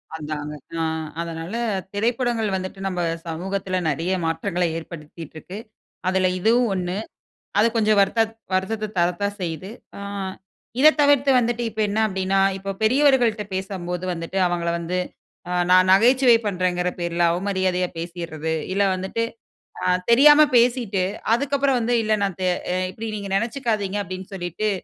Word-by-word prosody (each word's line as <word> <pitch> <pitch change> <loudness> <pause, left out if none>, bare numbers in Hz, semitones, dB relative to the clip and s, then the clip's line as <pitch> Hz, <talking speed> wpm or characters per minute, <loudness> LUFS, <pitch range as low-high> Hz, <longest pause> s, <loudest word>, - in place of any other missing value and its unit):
அதாங்க. 150 -1 -5 0.3
அ - - 0 0.4
அதனால, 165 +2 -6 0.4
திரைப்படங்கள் 230 +1 0
வந்துட்டு 185 +1 -5
நம்ம 180 -2 -3 0.3
சமூகத்தில 185 +3 -3
நிறைய 165 +5 -1
மாற்றங்களை 175 +2 -1
ஏற்படுத்திட்டு 160 -1 -10
இருக்கு. 185 +5 -9 0.5
அதில 185 0 +2
இதுவும் 235 +5 +3
1. 180 0 -2 0.6
அது 220 - +5
கொஞ்சம் 215 -2 +3
வருத்த 200 +3 +3 0.3
வருத்தத்த 210 +3 -1
தரத்தா 175 +3 +1
செய்யுது. 175 +2 -4 0.3
அ - - -8 0.8
இத 300 - +8
தவிர்த்து 285 -1 +4
வந்துட்டு 240 0 -1
இப்ப 220 0 -3
என்ன 210 +2 -1
அப்படின்னா, 190 -1 0 0.2
இப்ப 195 +1 -5
பெரியவர்கள்ட்ட 245 -3 +3
பேசும்போது 185 -2 -4
வந்துட்டு 165 +3 -5
அவங்கள 170 -1 -1
வந்து 170 +2 -3 0.5
அ - - -3 0.2
நான் 185 0 +6
நகைச்சுவை 240 +5 +6
பண்றேன்ங்கிற 180 -2 0
பேர்ல 170 0 -1
அவமரியாதையா 185 0 0
பேசிர்றது, 165 -2 -4 0.2
இல்ல 200 - +2
வந்துட்டு 190 +5 -2 0.6
அ - - -1 0.3
தெரியாம 295 +5 +8 0.2
பேசிட்டு, 235 -5 +2 0.3
அதுக்கப்புறம் 275 +1 +1
வந்து 240 +1 0
இல்ல 215 0 +1
நான் 195 -2 -2
த - - -1 0.3
அ - - 0 0.2
இப்படி 225 +4 -6
நீங்க 200 -1 -6
நினைச்சுக்காதீங்க 220 -4 -1
அப்படின்னு 185 0 -7
சொல்லீட்டு, 185 +3 -2
190 Hz, 135 wpm, -23 LUFS, 175-225 Hz, 0.8 s, இத